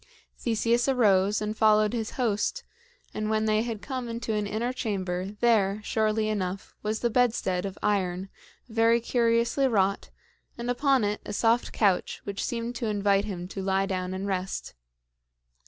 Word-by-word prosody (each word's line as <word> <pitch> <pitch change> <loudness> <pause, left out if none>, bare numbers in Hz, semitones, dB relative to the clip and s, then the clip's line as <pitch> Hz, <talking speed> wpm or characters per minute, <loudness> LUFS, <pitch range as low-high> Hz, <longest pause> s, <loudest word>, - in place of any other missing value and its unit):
Theseus 235 +1 +1
arose 205 -5 +3
and 210 +1 -3
followed 215 0 +4
his 225 -3 -2
host; 240 - 0 0.5
and 215 0 -2
when 220 0 +1
they 215 0 +2
had 225 -3 -4
come 255 -3 -4
into 230 -1 -3
an 210 -1 -1
inner 230 +5 -2
chamber, 190 -5 -3
there, 210 -4 +3
surely 215 0 +1
enough, 195 -3 -3
was 215 +1 -2
the 235 - +1
bedstead, 215 -6 +1
of 195 - -8
iron, 190 -2 0 0.4
very 230 0 +3
curiously 235 +3 +2
wrought, 200 -5 +1 0.5
and 240 +1 -2
upon 270 -1 +2
it 205 0 -1
a - - -6
soft 230 +3 +2
couch 195 -4 +1
which 200 -1 -4
seemed 235 -1 -3
to 235 - -2
invite 200 -1 +2
him 180 -4 -5
to 195 - -5
lie 190 0 +1
down 185 -1 -3
and 190 +1 -4
rest. 190 -1 -3
215 Hz, 160 wpm, -27 LUFS, 195-235 Hz, 0.5 s, followed